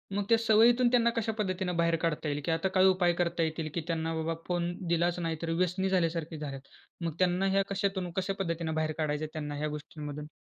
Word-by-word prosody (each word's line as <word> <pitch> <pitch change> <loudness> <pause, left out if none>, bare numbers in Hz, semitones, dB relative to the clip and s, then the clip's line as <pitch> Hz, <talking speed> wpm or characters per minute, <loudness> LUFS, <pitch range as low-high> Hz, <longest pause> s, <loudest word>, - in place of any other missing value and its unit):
मग 205 - +1
त्या 230 - +6
सवयीतून 230 +2 +5
त्यांना 235 -2 +4
कशा 225 -1 0
पद्धतीनं 185 -3 -1
बाहेर 170 0 +3
काढता 165 -2 -1
येईल? 145 0 -2
की - - 0
आता 165 +3 +1
काय 185 0 +6
उपाय 180 -2 +4
करता 170 -1 0
येतील, 160 0 -2
की 170 - -1
त्यांना 165 -1 -1
बाबा 160 +1 -1
फोन 175 -1 0 0.2
दिलाच 170 +1 +1
नाही 165 -2 -2
तर 165 - -3
व्यसनी 180 +3 0
झाल्यासारखी 165 -3 0
झाल्यात. 140 -3 -6 0.4
मग 165 - -1
त्यांना 185 +1 +2
ह्या 195 0 +3
कशातून 195 -2 -1
कशा 190 +1 0
पद्धतीनं 165 -3 -2
बाहेर 155 0 0
काढायचं 155 -1 -1
त्यांना 150 -2 -4
ह्या 150 +1 -2
गोष्टींमधून? 150 0 -6
170 Hz, 210 wpm, -30 LUFS, 160-190 Hz, 0.4 s, त्या